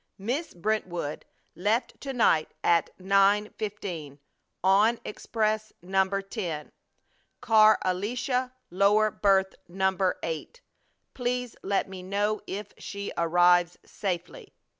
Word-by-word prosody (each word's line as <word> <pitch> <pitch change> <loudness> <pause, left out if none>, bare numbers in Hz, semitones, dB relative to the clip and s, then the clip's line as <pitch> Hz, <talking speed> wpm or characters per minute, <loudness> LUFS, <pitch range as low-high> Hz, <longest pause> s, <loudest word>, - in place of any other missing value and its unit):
Miss 250 - -3
Brentwood 175 -5 -2 0.3
left 220 +6 -1
to 275 - -4
night 165 -11 +2
at 170 -1 +3
nine 195 +2 +3
fifteen 180 -9 -5 0.5
on 205 +5 +4
express 215 0 -2
number 190 +2 0
ten, 175 -7 -5 0.7
car 215 -1 +6
Alicia 250 +7 -1 0.2
lower 205 +3 +3
berth 195 -2 +2
number 190 +1 0
eight. 165 - -5 0.5
Please 250 -1 -2
let 195 0 0
me 190 -1 -8
know 205 +3 -1
if 205 +2 -6
she 200 0 -6
arrives 175 +1 +3
safely. 195 - -5
200 Hz, 105 wpm, -27 LUFS, 180-215 Hz, 0.7 s, car